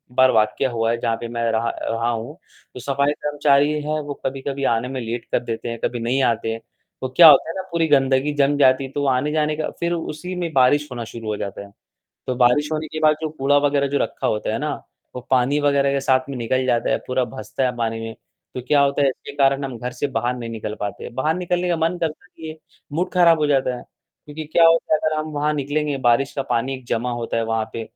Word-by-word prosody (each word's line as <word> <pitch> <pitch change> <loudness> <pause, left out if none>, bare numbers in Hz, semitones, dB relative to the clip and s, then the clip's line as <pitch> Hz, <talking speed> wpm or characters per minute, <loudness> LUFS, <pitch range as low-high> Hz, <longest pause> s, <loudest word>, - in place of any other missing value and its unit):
बार 130 0 +5
वाकया 110 +5 +1
हुआ 115 0 0
है 115 - 0
जहाँ 115 -1 0
पे 120 - -4
मैं 115 0 -4
रहा 115 +1 0
रहा 115 +1 -1
हूँ, 120 +6 -4 0.4
जो - - -6
सफ़ाई 140 +2 +1
कर्मचारी 145 0 +2
है, 155 +1 -2
वो 145 -1 -5
कभी-कभी 135 +1 -3
आने 115 +2 -1
में 130 0 -4
लेट 115 0 -4
कर - - +2
देते 115 0 -4
हैं, 115 0 -5
कभी 120 - -1
नहीं 125 +4 0
आते 115 -2 0
हैं। 115 - -4 0.4
तो 130 - -3
क्या 160 +6 +8
होता 155 - +5
है - - -3
ना 190 - -2
पूरी 165 -1 +1
गंदगी 135 0 +2
जम 145 0 +2
जाती 135 -1 +4
है, 135 - -6
तो 145 0 -2
आने-जाने 150 +4 +1
का 155 - -2
फिर 170 0 0
उसी 170 +2 -5
में 175 -2 -3
बारिश 140 +3 +3
होना 120 -2 -4
शुरू 115 0 -9
हो 105 - -2
जाता 100 0 -5
है, 100 0 -12 0.6
तो 130 - -1
बारिश 125 +4 +3
होने 155 0 -2
के 155 - -4
बाद, 155 -1 +4
जो 160 - -1
कूड़ा 145 -1 +2
वग़ैरह 140 -1 +1
जो 140 - 0
रखा - - -2
होता 105 0 -1
है 115 - -1
ना, 150 +1 -2 0.4
वो 125 - -5
पानी 130 +3 +2
वग़ैरह 140 -1 +2
के 140 - 0
साथ 130 -1 +1
में 140 - -5
निकल 130 +2 -1
जाता 120 -2 +1
है, - - +2
पूरा 130 0 0
भसता 135 +1 -4
है 125 -1 -3
पानी 115 -1 -2
में, 115 0 -6 0.4
तो 125 - -3
क्या 145 - +4
होता 140 0 +2
है 140 - +4
इसके 130 - -6
कारण 140 0 +2
हम 130 -3 -5
घर 125 +2 -5
से 125 +3 -2
बाहर 120 +2 -1
नहीं 120 -2 -6
निकल 110 -1 -5
पाते, 100 -1 -5
बाहर 135 +6 0
निकलने 180 0 -1
का 175 - +1
मन 165 +2 0
करता 165 +1 -4
नहीं 160 -2 -11
है, 155 - -7 0.4
मूड 170 +5 -1
खराब 170 -3 +5
हो 150 - +1
जाता 135 -3 +1
है। - - -11 0.4
क्योंकि 150 +1 -7
क्या 170 - +5
होता 165 -1 +3
है - - +3
अगर 155 0 -1
हम 155 0 -2
वहाँ 150 +1 0
निकलेंगे, 145 0 -1
बारिश 130 +1 +2
का 135 - 0
पानी 130 +3 0
जमा 120 +2 -1
होता 120 -1 -3
है 115 - +1
वहाँ 115 0 -1
पे, 115 - -4
135 Hz, 250 wpm, -21 LUFS, 120-150 Hz, 0.6 s, क्या